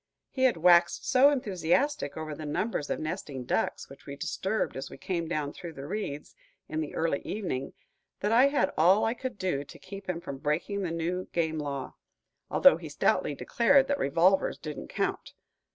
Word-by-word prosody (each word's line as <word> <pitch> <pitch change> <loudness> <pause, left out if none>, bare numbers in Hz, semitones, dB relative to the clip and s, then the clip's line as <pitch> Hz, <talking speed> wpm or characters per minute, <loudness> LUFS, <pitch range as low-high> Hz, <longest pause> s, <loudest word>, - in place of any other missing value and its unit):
He 260 -1 +1
had 245 -9 +3
waxed 175 +1 +4
so 265 +2 +6
enthusiastic 245 - 0
over 155 -1 -4
the 155 - -7
numbers 150 -1 -2
of - - -1
nesting 155 -5 -4
ducks - - -1
which 135 - -15
we 140 - -6
disturbed 190 +8 -2
as 135 +1 -5
we - - -10
came 170 +3 -3
down 150 -3 -2
through 170 -2 -8
the 135 -2 -8
reeds, 150 -5 -5 0.3
in 155 - -2
the 150 - -5
early 160 -3 0
evening, 175 -11 -4 0.5
that 205 - 0
I 250 +4 +6
had 280 -10 +1
all 180 +6 +5
I 225 - +1
could 255 -2 -6
do 180 -8 -1
to 145 - -13
keep 195 0 -10
him 175 -2 -1
from 140 -5 -7
breaking 160 +7 -1
the 185 - -2
new 170 +3 -2
game 160 -2 0
law, 140 -3 -5 0.5
although - - +6
he - - -8
stoutly - - +1
declared 265 +3 +3
that 285 - +1
revolvers 170 +7 +3
didn't 150 -3 -7
count. - - -3
170 Hz, 185 wpm, -29 LUFS, 150-210 Hz, 0.5 s, so